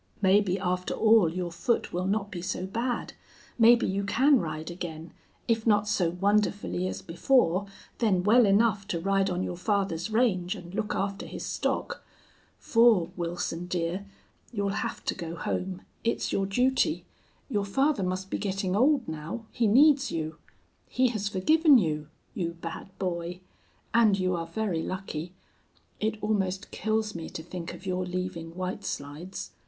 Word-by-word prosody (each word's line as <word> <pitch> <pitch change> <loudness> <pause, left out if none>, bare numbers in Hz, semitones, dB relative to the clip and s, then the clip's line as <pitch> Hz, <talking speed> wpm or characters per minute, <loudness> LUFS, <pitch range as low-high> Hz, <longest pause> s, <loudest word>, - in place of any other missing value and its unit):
Maybe, 195 -1 +3
after 180 -1 -1
all, 220 -6 +5
your 175 0 -3
foot 230 +8 -1
will 180 +1 -1
not 205 0 -1
be 175 - -5
so 185 +1 -3
bad. 235 +5 -2 0.5
Maybe 235 +1 +6
you 195 +1 -1
can 265 +7 +4
ride 155 -1 -4
again, 165 -2 -7 0.3
if 230 -1 +1
not 210 -1 +4
so 190 -5 +2
wonderfully 200 0 0
as - - -5
before, 185 0 +2 0.3
then 195 -6 +2
well 225 +3 +6
enough 200 0 +3
to 175 -5 -2
ride 195 +2 +1
on 180 0 -1
your 175 - -4
father's 195 -2 -1
range 215 -6 +1
and 175 +1 -10
look 210 +1 -2
after 200 0 -2
his - - -6
stock. - - -2 0.5
For, 225 -7 +4
Wilson 175 0 -3
dear, 180 +2 -2 0.4
you'll 200 -4 -1
have 230 - -5
to - - 0
go 170 -2 -6
home. 185 +2 -3 0.2
It's 230 - 0
your 195 -1 +1
duty. 260 +9 +1 0.4
Your 210 -7 0
father 270 +6 +1
must 185 +1 -3
be - - -1
getting 195 -2 -1
old 265 +3 +3
now. 160 +9 -5
He 235 - +1
needs 275 +5 +5
you. 160 -1 -3 0.5
He 255 0 +2
has 210 -3 -2
forgiven 300 - +5
you 155 -7 0 0.3
you 170 -2 -2
bad 170 +2 -7
boy! 175 -1 -3 0.5
And 225 -4 +5
you 185 -1 +1
are 165 -1 -3
very 175 -1 -1
lucky. 180 -2 -5 0.6
It 220 0 -1
almost 195 -3 -1
kills 215 0 -1
me 165 -1 -6
to 160 - -7
think 170 0 -6
of 185 - -13
your 185 -1 -1
leaving 180 -2 -4
White 185 0 -4
Slides. 150 +7 -6
190 Hz, 160 wpm, -28 LUFS, 175-220 Hz, 0.6 s, Maybe